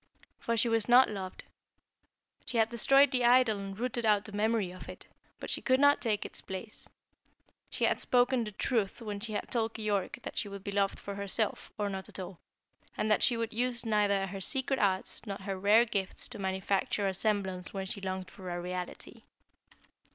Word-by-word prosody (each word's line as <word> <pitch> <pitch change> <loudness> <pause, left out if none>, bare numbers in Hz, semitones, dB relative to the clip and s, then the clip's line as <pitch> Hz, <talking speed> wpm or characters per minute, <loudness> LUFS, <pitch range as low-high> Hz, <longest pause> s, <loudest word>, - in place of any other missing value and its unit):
For 230 0 -1
she 230 - +3
was 225 -1 +2
not 250 -1 +7
loved. 190 -3 -6 1.0
She 240 - -1
had 225 0 +4
destroyed 275 +4 +5
the 250 -3 +2
idol 240 -3 +5
and 195 -1 -6
rooted 245 0 -2
out 210 -2 +3
the 215 - -8
memory 210 -2 0
of 185 - -10
it, - - -9 0.3
but - - -5
she - - +3
could 260 0 +3
not 285 0 +5
take 215 -4 0
its - - -6
place. 190 +3 -7 0.8
She - - -3
had - - +3
spoken 245 0 +2
the 210 - -5
truth 210 -1 -1
when 205 -2 -4
she 215 +1 -4
had - - -4
told 225 -2 -1
Keyork 210 -3 -1
that - - -4
she 205 - -3
would 200 -1 -8
be 200 - -4
loved 200 -1 +1
for 200 - -7
herself, 200 +2 -1
or 205 - -1
not 190 -1 -5
at - - -10
all, 185 -2 -7 0.6
and 215 - 0
that 210 - +4
she 240 - +4
would 230 -1 -3
use 240 +1 -1
neither 205 -3 +2
her 195 0 -6
secret 265 +5 -1
arts 190 -2 0
nor 195 -1 -3
her 195 0 -4
rare 205 +5 +5
gifts 195 -4 -1
to - - -6
manufacture 190 +1 0
a 190 - 0
semblance 190 -3 -1
when 195 -1 -4
she 200 +1 -5
longed 185 -2 -4
for 185 -2 -9
a 175 0 -3
reality. 180 0 -6
210 Hz, 205 wpm, -31 LUFS, 195-230 Hz, 1.0 s, not